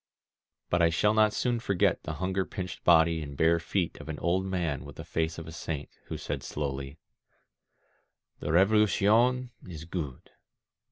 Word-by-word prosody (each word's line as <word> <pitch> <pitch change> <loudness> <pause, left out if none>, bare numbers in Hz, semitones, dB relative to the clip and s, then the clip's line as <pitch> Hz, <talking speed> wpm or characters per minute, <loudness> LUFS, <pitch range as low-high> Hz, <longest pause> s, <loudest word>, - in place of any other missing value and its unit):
But 85 - +3
I 85 - +5
shall 105 +6 +2
not 110 -1 +4
soon 120 +2 0
forget 100 -5 +1
the 75 - -5
hunger 95 +4 -1
pinched 90 -1 -6
body 80 -1 +5
and 70 -2 -7
bare 85 +2 +4
feet 85 +1 -2
of - - -11
an 75 - -4
old 95 +2 0
man 85 -7 -2
with - - -10
the - - -7
face 80 0 -1
of 80 - -7
a - - -7
saint, 75 -2 -5 0.2
who - - -5
said - - -4
slowly: 70 0 -4 1.4
"The 75 - -3
Revolucion 110 +6 +3 0.2
is 80 -3 -8
good. 80 -7 -6
85 Hz, 165 wpm, -29 LUFS, 80-100 Hz, 1.4 s, I